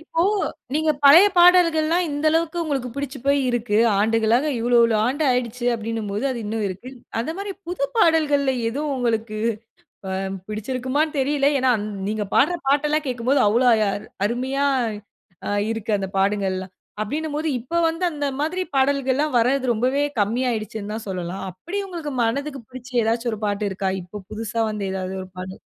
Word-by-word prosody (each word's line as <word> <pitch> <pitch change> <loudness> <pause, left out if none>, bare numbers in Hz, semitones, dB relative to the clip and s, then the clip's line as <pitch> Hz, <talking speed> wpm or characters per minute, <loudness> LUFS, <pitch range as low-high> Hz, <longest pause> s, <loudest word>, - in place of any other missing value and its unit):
இப்போ 325 +1 -1 0.5
நீங்க 310 +1 +2
பழைய 330 +8 +9
பாடல்கள்லாம் 345 -1 +5
இந்த 290 +2 -1
அளவுக்கு 330 +1 0
உங்களுக்கு 275 -5 -2
பிடுச்சு 280 -1 -4
போய் 280 0 +3
இருக்கு. 230 -3 0 0.2
ஆண்டுகளாக 225 +4 +2
இவ்வளவு 240 +1 +3
இவ்வளவு 225 -2 +3
ஆண்டு 275 +5 -1
ஆயிடுச்சு 245 -1 -1
அப்படினும் 225 -1 -4
போது 205 +6 -2
அது 250 - -3
இன்னும் 215 +1 -2
இருக்கு. 195 +7 -8 0.3
அந்த 235 +7 -2
மாரி 400 0 -4 0.2
புது 345 -5 -2
பாடல்களிலே 295 -8 +3
எது 250 +6 -3
உங்களுக்கு 225 -3 -1 0.7
அ - - -3 0.4
பிடிச்சுயிருக்குமான்னு 260 +8 -2
தெரில. 280 +1 +2
ஏன்னா 260 0 +3
அந் 210 0 -4 0.2
நீங்க 215 0 -1
பாடற 355 - +4
பாட்டு 285 +2 +3
எல்லாம் 305 0 0
கேட்கும்போது 255 +2 +1
அவ்ளோ 235 +5 +3 0.2
அ - - +1 0.4
அருமையா 260 +4 -1 0.8
அ - - -1 0.2
இருக்கு. 225 -1 -3
அந்த 195 -1 -3
பாடல்கள்லாம். 190 -2 -1 0.3
அப்பிடின்னு 295 +8 -3
போது 315 +1 -1
இப்போ 255 +9 -5
வந்து 330 +3 -2
அந்த 290 -1 -2
மாதிரி 340 +5 -1
பாடல்கள்லாம் 275 +1 +1
வரது 255 +2 +2
ரொம்பவே 255 +5 +1 0.2
கம்மி 220 +5 +1
ஆயிடுச்சுன்னு 215 -2 -4
தான் 220 0 -6
சொல்லலாம். 185 0 -4
அப்படி 335 - -6
உங்களுக்கு 330 -6 -5
மனதுக்கு 275 +3 -2
பிடிச்சு 255 0 -10
ஏதாச்சும் 230 +1 0
ஒரு 215 - -5
பாட்டு 205 0 -1
இருக்கா? 190 0 -2
இப்போ 180 +4 -9
புதுசா 225 +1 -3
வந்த 210 -2 -4
ஏதாவது 190 0 -4
ஒரு 185 - -11
பாடல்? 185 +1 -7
250 Hz, 165 wpm, -22 LUFS, 215-290 Hz, 0.8 s, பழைய